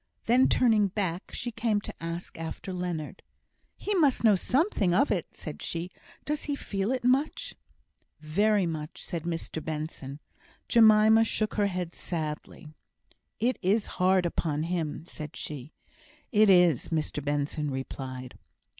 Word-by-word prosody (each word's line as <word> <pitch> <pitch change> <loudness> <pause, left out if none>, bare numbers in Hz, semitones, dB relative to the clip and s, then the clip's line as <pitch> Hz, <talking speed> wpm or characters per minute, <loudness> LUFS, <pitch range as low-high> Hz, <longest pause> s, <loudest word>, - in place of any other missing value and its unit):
Then 250 +3 +4
turning 220 -5 +4
back, 185 -3 -3
she 240 - -4
came 220 -2 0
to - - -7
ask 165 +1 -5
after 165 +3 -5
Leonard. 175 -4 -4 0.6
"He 415 - -2
must 300 -11 +3
know 220 -2 +7
something 230 - +1
of 275 +7 +3
it," 180 -5 -2
said 155 - -7
she. 170 +2 -4 0.3
"Does 300 0 -2
he 290 - -1
feel 200 -4 -2
it 260 -2 -1
much?" 260 +5 +1 0.7
"Very 200 +6 +2
much," 155 -1 -5
said 170 -3 -5
Mr 165 -2 -4
Benson. 150 -3 -5 0.5
Jemima 220 -1 +6
shook 215 -1 -1
her 205 -1 +2
head 180 -3 -3
sadly. 155 -2 -5 0.7
"It 250 +3 +1
is 200 +3 +2 0.2
hard 185 0 +4
upon 155 -3 -1
him," 165 -2 -3
said 155 -3 -8
she. 145 -1 -6 0.6
"It 215 -2 +5
is," 175 -7 +5
Mr 155 -3 -2
Benson 145 +1 -1
replied. 130 -1 -6
180 Hz, 140 wpm, -28 LUFS, 155-215 Hz, 0.7 s, know